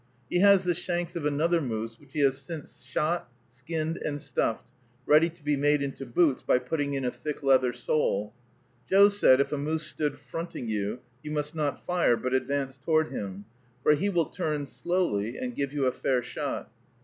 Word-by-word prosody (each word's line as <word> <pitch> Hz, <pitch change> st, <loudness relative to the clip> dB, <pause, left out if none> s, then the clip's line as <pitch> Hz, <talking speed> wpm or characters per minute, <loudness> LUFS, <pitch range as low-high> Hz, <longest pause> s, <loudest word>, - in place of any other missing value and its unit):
He 175 Hz, -, +2 dB
has 200 Hz, 0 st, +6 dB
the 180 Hz, -1 st, +2 dB
shanks 175 Hz, 0 st, -1 dB
of 155 Hz, -3 st, -1 dB
another 165 Hz, +4 st, +2 dB
moose 115 Hz, -3 st, -4 dB
which 140 Hz, -2 st, -21 dB
he 150 Hz, -, 0 dB
has 135 Hz, -1 st, +3 dB
since 150 Hz, +2 st, -8 dB
shot, 170 Hz, -3 st, -1 dB, 0.2 s
skinned 155 Hz, +6 st, -3 dB
and 145 Hz, -1 st, -2 dB
stuffed, 135 Hz, -5 st, -1 dB, 0.3 s
ready 155 Hz, +3 st, +5 dB
to 165 Hz, -2 st, -18 dB
be 145 Hz, 0 st, +1 dB
made 145 Hz, +1 st, +2 dB
into 135 Hz, -1 st, -5 dB
boots 140 Hz, +2 st, +2 dB
by -, -, +3 dB
putting 140 Hz, +2 st, -2 dB
in 135 Hz, -1 st, -2 dB
a 125 Hz, -, 0 dB
thick 150 Hz, +1 st, -6 dB
leather 130 Hz, -2 st, +4 dB
sole. 105 Hz, -7 st, -1 dB, 0.6 s
Joe 200 Hz, +1 st, +7 dB
said, 200 Hz, -10 st, +5 dB
if 140 Hz, -, +1 dB
a 150 Hz, -, -1 dB
moose 155 Hz, +3 st, -1 dB
stood 150 Hz, -1 st, -2 dB
fronting 165 Hz, -7 st, -6 dB
you, 105 Hz, +2 st, -2 dB, 0.2 s
you 150 Hz, -, -7 dB
must 150 Hz, 0 st, -2 dB
not 150 Hz, -3 st, -2 dB
fire, 175 Hz, -9 st, +2 dB
but 130 Hz, +2 st, -3 dB
advance 135 Hz, 0 st, -1 dB
toward 155 Hz, 0 st, +2 dB
him, 100 Hz, 0 st, -6 dB, 0.4 s
for -, -, +5 dB
he 190 Hz, +7 st, +1 dB
will 175 Hz, -4 st, +2 dB
turn 155 Hz, -5 st, -2 dB
slowly 135 Hz, -, -1 dB
and 250 Hz, -1 st, -4 dB
give 140 Hz, -, -2 dB
you 145 Hz, -2 st, 0 dB
a 130 Hz, -, +3 dB
fair 125 Hz, -1 st, 0 dB
shot. -, -, -4 dB
145 Hz, 195 wpm, -28 LUFS, 130-165 Hz, 0.6 s, Joe